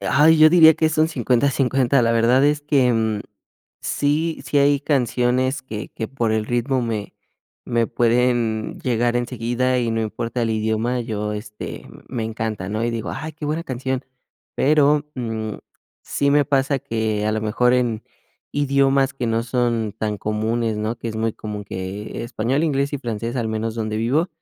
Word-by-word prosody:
Ay, 155 +3 +4
yo 155 0 +8
diría 160 -2 +8
que 160 - +1
es 155 0 -1
un 155 +1 +4
50, 130 -2 +1
50. 135 -1 +2
La 115 0 +2
verdad 120 +4 +4
es 145 0 +2
que, 140 -4 +2
mm, 110 -2 0 0.6
sí 155 +3 0
sí 145 - +1
hay 140 0 +4
canciones 130 -1 +1
que 110 -5 -6
que 110 - -5
por 120 -4 -1
el 110 -1 0
ritmo 125 +2 0
me 110 -3 -4 0.5
me 115 -1 +1
pueden 120 -2 +1
llegar 120 -1 +1
enseguida, 120 +1 0
y 120 -2 0
no 115 - 0
importa 115 +3 -3
el 115 - 0
idioma, 110 +3 0
yo, 105 -3 -3
este, 105 0 -7 0.2
me 120 -4 -3
encanta, 110 -4 -4
¿no? 110 +2 -2
Y 120 - 0
digo: 115 -2 -4
"Ay, 155 +3 -5
qué 155 0 -8
buena 155 +3 -1
canción". 130 -2 -3 0.5
Pero, 150 0 +3
mm, 110 -4 -4 0.5
sí 140 0 0
me 145 0 +4
pasa 140 0 +1
que, 110 -2 -1
a - - +2
lo 110 - -1
mejor, 120 +3 +2
en 120 -3 0 0.5
idiomas 140 -1 +2
que 125 -3 -3
no 115 0 +1
son 120 -3 0
tan 105 -2 -2
comunes, 110 +1 -1
¿no?, 110 +2 -2
que 115 - -7
es 110 - -5
muy 110 0 0
común 105 -1 -6
que 100 +4 -5
español, 120 +6 -1
inglés 140 -2 0
y - - -2
francés, 115 -1 -4
al 115 -3 -1
menos 110 +1 -2
donde 110 -1 -2
vivo, 135 +10 +1
120 Hz, 180 wpm, -21 LUFS, 110-135 Hz, 0.6 s, yo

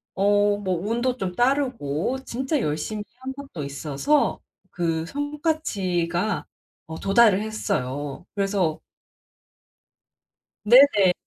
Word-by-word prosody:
어 205 +1 +3
뭐 190 -3 -1
운도 245 +2 0
좀 185 -2 -3
따르고 250 - 0
진짜 265 +5 -1
열심히 160 +8 -2 0.2
한 265 0 -4
것도 270 - -8
있어서 145 - 0 0.3
그 165 -2 -1
성과치가 215 - -1 0.4
어 160 0 -7
도달을 200 -1 +5
했어요. 145 -9 -3
그래서 195 -5 0 1.8
네네. 215 -6 +6
205 Hz, 190 characters per minute, -24 LUFS, 170-260 Hz, 1.8 s, 네네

